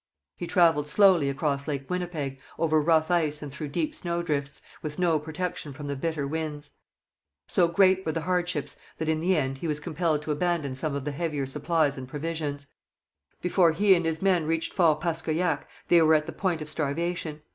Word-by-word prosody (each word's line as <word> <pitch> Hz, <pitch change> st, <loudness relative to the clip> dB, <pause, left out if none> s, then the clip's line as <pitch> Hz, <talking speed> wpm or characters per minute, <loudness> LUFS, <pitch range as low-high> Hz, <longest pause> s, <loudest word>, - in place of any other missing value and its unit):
He 175 Hz, -, -5 dB
travelled 165 Hz, -6 st, +3 dB
slowly 175 Hz, -3 st, +5 dB
across 140 Hz, +1 st, -1 dB
Lake 140 Hz, -3 st, -3 dB
Winnipeg, 165 Hz, -7 st, -3 dB, 0.2 s
over 155 Hz, -2 st, +2 dB
rough 160 Hz, +1 st, +3 dB
ice 155 Hz, -4 st, +1 dB
and 145 Hz, -, -6 dB
through 150 Hz, +2 st, -5 dB
deep 305 Hz, -, -2 dB
snowdrifts, 170 Hz, -, -2 dB, 0.2 s
with 150 Hz, -1 st, -5 dB
no 170 Hz, -4 st, +2 dB
protection 160 Hz, 0 st, -5 dB
from 145 Hz, +2 st, -8 dB
the 140 Hz, 0 st, -3 dB
bitter 155 Hz, +1 st, -2 dB
winds. 150 Hz, -1 st, -4 dB, 0.8 s
So 175 Hz, -, +3 dB
great 190 Hz, +2 st, +4 dB
were 160 Hz, -, -1 dB
the 165 Hz, -, -2 dB
hardships 175 Hz, -2 st, -1 dB, 0.2 s
that, 160 Hz, -, -2 dB
in 160 Hz, 0 st, +1 dB
the 180 Hz, +2 st, +2 dB
end, 135 Hz, -2 st, -1 dB
he 170 Hz, -, -3 dB
was 150 Hz, -1 st, 0 dB
compelled 155 Hz, -1 st, -1 dB
to 155 Hz, -, -3 dB
abandon 150 Hz, -3 st, -1 dB
some 140 Hz, +2 st, -3 dB
of 140 Hz, -1 st, -4 dB
the 150 Hz, -, -1 dB
heavier 150 Hz, -2 st, -2 dB
supplies 150 Hz, +1 st, 0 dB
and 130 Hz, -, -7 dB
provisions. 145 Hz, 0 st, -4 dB, 0.8 s
Before 180 Hz, -2 st, +4 dB
he 200 Hz, +4 st, +5 dB
and 175 Hz, -2 st, +2 dB
his 160 Hz, +2 st, -2 dB
men 180 Hz, -5 st, +2 dB
reached 165 Hz, 0 st, -1 dB
Fort 160 Hz, -5 st, +3 dB
Paskoyac 165 Hz, +1 st, -1 dB, 0.2 s
they 170 Hz, -1 st, +6 dB
were 160 Hz, 0 st, +5 dB
at 150 Hz, 0 st, +1 dB
the 165 Hz, -, -5 dB
point 175 Hz, -5 st, -1 dB
of 150 Hz, -, -10 dB
starvation. 155 Hz, +1 st, -2 dB
160 Hz, 190 wpm, -27 LUFS, 150-170 Hz, 0.8 s, they